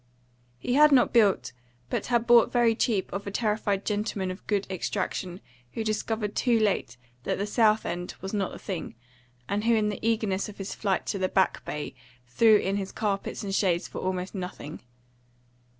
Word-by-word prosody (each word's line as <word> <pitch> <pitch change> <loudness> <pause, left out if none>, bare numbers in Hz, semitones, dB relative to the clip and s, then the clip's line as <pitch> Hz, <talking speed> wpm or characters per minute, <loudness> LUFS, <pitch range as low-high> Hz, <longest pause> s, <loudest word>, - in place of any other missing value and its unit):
He 245 - -2
had 300 +2 +7
not 260 -3 +4
built, 205 - +3 0.4
but - - -1
had 240 -2 +2
bought 235 -1 +6
very 240 -2 +4
cheap 220 -3 0
of 200 +1 -4
a - - -1
terrified 210 -2 -1
gentleman 205 -3 -1
of 185 - -10
good 200 -2 0
extraction 185 0 -3 0.3
who 225 - -2
discovered 215 -1 -2
too 240 -3 +3
late 205 - 0 0.2
that - - -2
the 200 - -1
South 215 0 +3
End 175 +1 -4
was 190 +2 -6
not 200 -3 -1
the - - -8
thing, 185 - -5 0.5
and 205 +5 -1
who 230 0 +4
in 210 -1 +2
the 205 - -4
eagerness 215 -4 0
of 210 - -11
his 195 0 -5
flight 195 -3 -1
to 200 - -2
the 185 0 0
Back 190 - +1
Bay 150 0 -5 0.3
threw 215 - +5
in 195 0 -1
his 195 -1 -4
carpets 205 -2 -2
and 195 -1 -3
shades 185 -3 +1
for - - -7
almost 185 0 -3
nothing. 180 -5 -6
205 Hz, 185 wpm, -27 LUFS, 190-220 Hz, 0.5 s, had